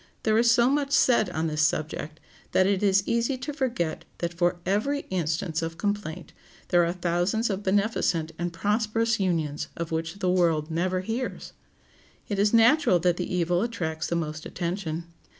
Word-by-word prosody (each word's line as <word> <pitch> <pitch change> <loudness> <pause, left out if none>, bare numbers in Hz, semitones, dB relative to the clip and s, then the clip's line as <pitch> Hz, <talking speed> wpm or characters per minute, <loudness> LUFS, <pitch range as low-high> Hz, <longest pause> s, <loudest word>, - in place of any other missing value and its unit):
There 220 0 +3
is 235 0 +4
so 235 +1 +5
much 280 +1 0
said 235 -7 +4
on 160 -2 -2
this 155 -1 -1
subject 155 0 -1 0.3
that 185 - +4
it 195 0 +1
is 200 -1 +3
easy 235 +3 +1
to 275 +4 -5
forget 235 - -2
that 170 0 -3
for 175 +1 0
every 215 +10 0
instance 165 -2 -1
of 165 0 -4
complaint 205 -4 -3 0.4
there 175 -1 +4
are 170 - +1
thousands 180 +5 0
of 195 0 -3
beneficent 190 -5 +1
and 175 0 -2
prosperous 215 +5 0
unions 165 -6 -1
of 165 -1 -4
which 165 +3 -3
the 185 -2 0
world 165 -4 +1
never 185 +3 0
hears. 225 +6 -4 0.7
It 200 -2 -2
is 205 +1 +3
natural 230 - +5
that 175 0 +2
the 180 - -3
evil 175 0 +1
attracts 165 -9 -2
the 170 - -1
most 155 -2 -3
attention. 170 -2 -3
180 Hz, 170 wpm, -26 LUFS, 165-220 Hz, 0.7 s, so